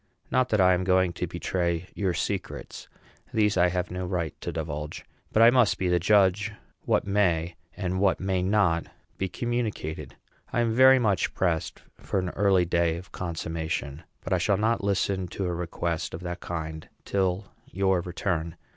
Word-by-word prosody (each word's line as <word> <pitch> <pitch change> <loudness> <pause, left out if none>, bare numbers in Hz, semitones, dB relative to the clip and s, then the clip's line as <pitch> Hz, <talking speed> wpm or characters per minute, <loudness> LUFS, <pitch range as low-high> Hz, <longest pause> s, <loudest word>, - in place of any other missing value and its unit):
Not 130 0 +2
that 105 - +2
I 95 -1 +6
am 90 0 0
going 90 -1 +3
to - - -3
betray 85 -1 -2
your 95 -4 -1
secrets; - - -4 0.4
these 105 -1 +2
I 90 -1 +4
have 90 0 -2
no 90 0 -3
right 85 -4 -2
to - - -3
divulge; 75 -2 -5 0.3
but 110 - +5
I 115 - +8
must 125 -4 +4
be 95 - 0
the 90 0 +3
judge 100 +1 +3 0.3
what - - +2
may, 90 -4 +1 0.2
and 95 -1 -2
what 95 -1 +2
may 95 -1 0
not, 95 -3 +2 0.3
be 95 - -1
communicated. 115 -8 -3 0.4
I 120 - +1
am 115 -1 +1
very 130 +2 +7
much 105 -8 +1
pressed 85 -2 -1 0.2
for - - -3
an 90 -1 0
early 95 -1 +3
day 85 -1 +1
of 90 +2 -11
consummation; 80 -4 -4 0.2
but - - -2
I 90 - +2
shall 100 +3 +2
not 110 +1 +1
listen 95 -1 0
to 95 +3 -4
a 90 - -1
request 85 -1 -3
of 85 - -8
that 90 0 -5
kind 80 -3 -5 0.2
till 95 0 -1 0.2
your 95 -1 +2
return. 85 -2 -2
90 Hz, 175 wpm, -27 LUFS, 85-100 Hz, 0.4 s, I